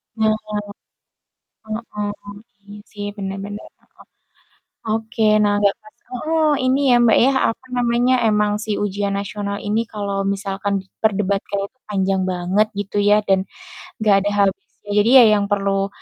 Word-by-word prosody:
Heeh, 220 -1 +2 1.6
heeh, 205 -1 -5 0.3
iya 205 0 -11
sih 205 -1 -6
benar 195 -1 -4
benar, 205 +1 -8
heeh. - - -22 0.9
Oke, 225 0 -2 0.2
nah, 205 0 +2
nggak 200 0 +2
pas 215 - -19
heeh 310 +5 0 0.2
ini 260 +2 +2
ya, - - +6
Mbak, 225 -2 +5
ya, 270 - +4 0.2
apa 245 - -14
namanya, 240 +1 +2 0.2
emang 210 0 +2
si 220 - -4
Ujian 200 0 -2
Nasional 200 0 -4
ini 215 +2 +1
kalau 200 -2 -3 0.2
misalkan 200 0 -3
diperdebatkan 200 0 -1
itu 255 - -43
panjang 195 -1 0
banget 185 +4 +1
gitu 205 0 -4
ya, 210 - +6
dan 195 -1 +4 0.6
enggak 215 -2 +4
ada - - +2
habisnya. 195 -1 +1 0.3
Jadi 210 +3 +3
ya - - +9
yang 200 - 0
perlu 195 -1 +1
205 Hz, 145 wpm, -20 LUFS, 200-220 Hz, 1.6 s, ya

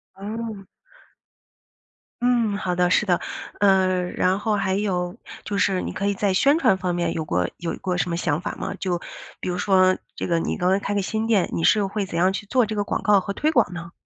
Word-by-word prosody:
哦。 210 +1 -6 1.6
嗯， 235 -4 +2
好 185 -3 -2
的， 180 0 +3
是 - - +4
的， 175 -2 +3 0.4
呃， 190 -2 +3
然 185 +1 +1
后 215 +1 -1
还 190 -2 0
有 185 -2 -1 0.3
就 205 - -3
是 190 -2 +2
你 - - -4
可 200 - -3
以 200 - +2
在 200 0 0
宣 280 - +3
传 225 -10 +3
方 180 -1 -2
面 175 0 -1
有 160 - -3
过 90 - 0
有 170 -1 -3
过 180 -2 -1
什 180 - -1
么 - - 0
想 155 -3 0
法 180 - -4
吗？ 195 - -4
就 180 -2 -1 0.4
比 - - -4
如 180 - -2
说 185 -1 +3 0.2
这 - - -4
个 170 - +1
你 165 - -1
刚 180 - 0
才 190 - +3
开 200 - -3
个 200 - +1
新 220 +3 -2
店， 215 -5 +2
你 165 - -2
是 210 +3 +4
会 200 +1 -2
怎 170 - -5
样 185 +2 +4
去 195 - -5
做 250 +4 +2
这 215 - -4
个 205 - 0
广 - - -2
告 205 -1 +4
和 200 +1 -4
推 300 - 0
广 235 - +2
呢？ 170 -1 -7
190 Hz, 250 characters per minute, -23 LUFS, 180-205 Hz, 1.6 s, 是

